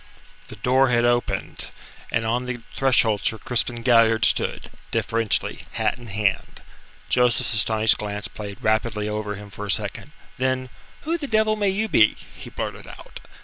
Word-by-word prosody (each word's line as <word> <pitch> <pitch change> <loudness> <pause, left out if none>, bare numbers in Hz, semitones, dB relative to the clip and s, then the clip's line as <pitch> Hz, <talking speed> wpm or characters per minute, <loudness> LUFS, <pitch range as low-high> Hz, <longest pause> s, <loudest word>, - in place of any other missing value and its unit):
The - - -9
door 130 +5 +3
had 120 -1 +3
opened, 120 0 -1 0.4
and 115 - 0
on 120 +3 0
the 125 -1 -4
threshold 120 -6 +2
Sir 110 - +1
Crispin 120 0 0
Galliard 115 -3 +5
stood, - - 0 0.2
deferentially, 115 -2 0
hat - - 0
in 120 - -11
hand. 100 -2 -2 0.4
Joseph's 125 +5 +2
astonished 110 0 +2
glance 105 -1 -3
played 100 -2 -8
rapidly 110 -1 0
over 105 -1 -3
him 100 0 -11
for 105 +1 -7
a - - -9
second. 90 - -2 0.3
Then: 130 -1 -1 0.3
"Who 330 +2 -2
the 290 - -4
devil 215 -2 +2
may 205 -2 +1
you 210 +3 -1
be?" 110 - +4 0.2
he - - -10
blurted - - -6
out. - - -11
115 Hz, 160 wpm, -23 LUFS, 105-125 Hz, 0.4 s, Galliard